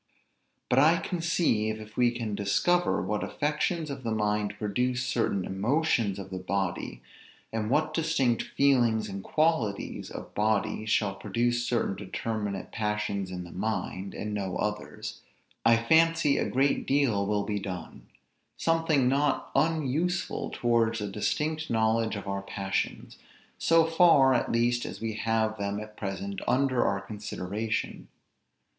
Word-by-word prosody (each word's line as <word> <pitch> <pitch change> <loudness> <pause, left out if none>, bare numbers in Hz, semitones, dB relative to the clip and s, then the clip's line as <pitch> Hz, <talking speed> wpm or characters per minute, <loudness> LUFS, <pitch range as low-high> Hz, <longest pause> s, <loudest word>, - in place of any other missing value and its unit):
But 125 - +3
I 160 +5 +6
conceive, 160 -12 0
if 110 0 -11
we 125 -1 +4
can 120 -3 -4
discover 175 - +1
what 105 0 -1
affections 155 +1 -1
of 140 -1 -6
the 115 - -3
mind 105 -1 0
produce 125 +5 -1
certain 115 -6 0
emotions 115 0 +1
of 95 -1 -8
the 95 - -4
body; 90 -9 -3 0.5
and 110 -1 -1
what 150 +5 +1
distinct 155 -8 +1
feelings 120 -6 +2
and 95 0 -6
qualities 155 -11 0
of - - -8
body 110 0 0
shall 105 -2 +2
produce 120 +5 -1
certain 115 -5 0
determinate 100 0 -4
passions 105 -3 -2
in 90 -1 -5
the 85 - -11
mind, 95 -1 -3
and 105 0 -4
no 95 -3 -2
others, 105 0 -4 0.4
I 115 0 +6
fancy 160 +4 +3
a - - 0
great 135 +2 +1
deal 120 -8 +2
will 105 -1 +1
be 105 0 -2
done; 95 -4 -7 0.5
something 165 -5 +2
not 140 +2 +1
unuseful 165 +3 0
towards 115 -2 +1
a 105 -1 -4
distinct 155 +10 -1
knowledge 110 0 +1
of 100 -1 -6
our 100 0 -2
passions, 95 0 -3 0.4
so 165 0 +4
far 165 -5 +5
at 120 - 0
least 120 +1 +2
as - - -6
we 115 -1 -3
have 110 0 0
them 100 0 -2
at 105 0 -9
present 100 -1 -4
under 130 -1 +2
our 100 0 0
consideration. 105 +1 -4
110 Hz, 140 wpm, -28 LUFS, 100-135 Hz, 0.5 s, I